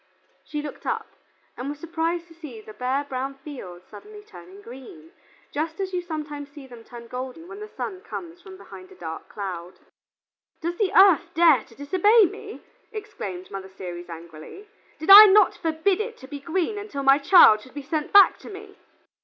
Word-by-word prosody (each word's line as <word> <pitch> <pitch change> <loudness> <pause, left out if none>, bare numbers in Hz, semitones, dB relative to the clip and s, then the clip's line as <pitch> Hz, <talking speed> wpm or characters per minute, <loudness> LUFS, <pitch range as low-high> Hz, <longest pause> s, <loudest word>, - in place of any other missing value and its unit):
She 300 -1 -5
looked 295 - -9
up, 455 -2 -2 0.5
and 255 +3 -6
was 290 - -6
surprised 335 +1 -3
to 330 - -17
see 305 -9 -11
the 215 0 -13
bare 255 +5 -2
brown 270 0 -5
fields 255 - -11
suddenly 415 - -13
turning 180 - -14
green, 320 - -13 0.4
just 315 +3 -3
as 380 -1 -4
you 360 - -1
sometimes 300 -4 -7
see 285 -1 -13
them 240 -3 -13
turn 235 0 -12
golden 255 +7 -8
when 380 +2 -10
the 425 - -8
sun 380 -3 -7
comes 350 -5 -9
from 375 0 -13
behind 370 0 -13
a - - -14
dark 160 - -8
cloud. 185 -3 -7 0.8
"Does 340 +1 -4
the 410 -4 +1
Earth 375 -2 +5
dare 330 -4 +5
to 230 - -20
disobey 380 - +4
me?" 340 - -8 0.3
exclaimed 305 - -8
Mother 195 -1 -7
Ceres 175 -2 -9
angrily. 165 - -11 0.3
"Did 315 +5 +1
I 415 +2 +13
not 415 +2 +5
forbid 330 +5 0
it 460 +1 -6
to 260 - -13
be 285 +1 -8
green 360 +7 -2
until 355 -10 -6
my 275 +1 +5
child 280 - +6
should 260 - -17
be 290 - -6
sent 305 +1 -3
back 400 -1 +6
to - - -12
me?" 405 0 -12
305 Hz, 185 wpm, -24 LUFS, 250-375 Hz, 0.8 s, I